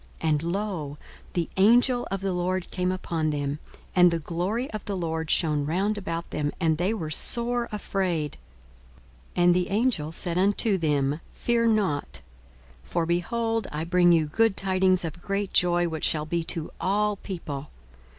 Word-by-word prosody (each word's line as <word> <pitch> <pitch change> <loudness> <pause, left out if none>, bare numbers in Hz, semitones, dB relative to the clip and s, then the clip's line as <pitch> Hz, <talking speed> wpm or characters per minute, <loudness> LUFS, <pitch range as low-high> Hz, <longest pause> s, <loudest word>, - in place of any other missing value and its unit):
42:002:009 160 - +1
And, 150 0 +1
lo, 180 -8 -3 0.4
the 170 -2 -1
angel 245 +5 +4
of 195 0 -3
the 195 -1 -1
Lord 180 +1 -2
came 180 -1 0
upon 165 -4 -1
them, 145 0 -2 0.4
and 180 -1 +7
the 170 - 0
glory 180 - -2
of 215 -2 -5
the 200 -2 -3
Lord 160 -2 -2
shone 150 -3 +2
round 190 +8 0
about 170 -4 -4
them: 150 -1 -1
and 160 -3 +1
they 180 +4 +1
were 165 -9 -3
sore 240 +7 +1
afraid. 185 -7 -2 1.0
42:002:010 175 - +2
And 175 0 +6
the 180 0 0
angel 205 -8 +1
said 170 +1 -1
unto 200 +1 +2
them, 145 -2 +1
Fear 235 -1 +1
not: 200 -10 0 0.6
for, 170 -1 -1
behold, 225 +7 0
I 150 +1 -3
bring 175 +1 +4
you 165 -2 +4
good 215 +7 +2
tidings 185 -1 +2
of 165 +2 -6
great 200 +1 -2
joy, 175 -1 +3
which 160 -2 -2
shall 155 -1 +1
be 170 +1 -1
to 165 -1 -3
all 205 +2 +1
people. 150 -8 -6
180 Hz, 170 wpm, -26 LUFS, 160-200 Hz, 1.0 s, and